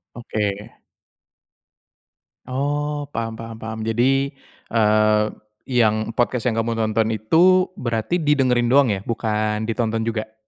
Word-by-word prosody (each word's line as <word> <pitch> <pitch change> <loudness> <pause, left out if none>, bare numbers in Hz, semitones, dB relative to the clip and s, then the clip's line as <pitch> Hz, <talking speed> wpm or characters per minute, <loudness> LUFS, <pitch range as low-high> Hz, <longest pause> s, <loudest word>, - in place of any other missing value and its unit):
Oke. 105 -3 -4 1.7
Oh, 145 +2 -2
paham 115 -1 -3
paham 115 0 -8
paham. 110 0 -6
Jadi, 135 +5 +1 0.4
eee, 105 -1 +4 0.5
yang 110 -3 +2
podcast 120 0 +1
yang 115 - -3
kamu 115 +1 0
tonton 110 0 0
itu 175 - +4
berarti 115 +7 -1
di 150 -3 +2
dengerin 125 -4 +2
doang 135 0 +4
ya 100 -2 0
bukan 110 -2 -1
ditonton 115 -1 -1
juga? 110 -1 -3
115 Hz, 120 wpm, -21 LUFS, 110-130 Hz, 1.7 s, eee